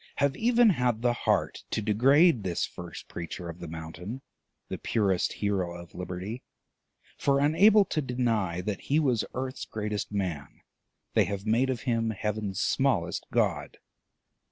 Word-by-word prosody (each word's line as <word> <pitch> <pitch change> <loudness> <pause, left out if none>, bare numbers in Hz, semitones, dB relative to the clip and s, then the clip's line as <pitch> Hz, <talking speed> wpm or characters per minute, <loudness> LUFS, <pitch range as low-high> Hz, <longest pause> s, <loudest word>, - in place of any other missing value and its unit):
have 140 -1 +1
even 235 -1 +4
had 125 - 0
the 120 -1 +3
heart - - 0
to - - -1
degrade 125 - +4
this 90 -3 -1
first - - -9
preacher 85 +1 -6
of 85 +1 -8
the 85 - -7
Mountain, 80 - -7 0.4
the - - -5
purest 100 -5 +1
hero 95 -4 -1
of 85 0 -12
Liberty; 90 +6 -5 0.8
for, 140 -1 +3
unable 195 +9 +5
to 155 - -1
deny 115 - 0
that 100 +1 -3
he 145 +3 +1
was 125 -8 +2
earth's 130 +1 -4
greatest 105 -2 -3
man, 90 -8 -4 0.5
they - - +4
have 100 0 -4
made 115 +5 +2
of 125 -3 -2
him 115 -3 0
heaven's 105 -2 -3
smallest 110 -11 +1
god." - - 0
110 Hz, 150 wpm, -28 LUFS, 95-130 Hz, 0.8 s, unable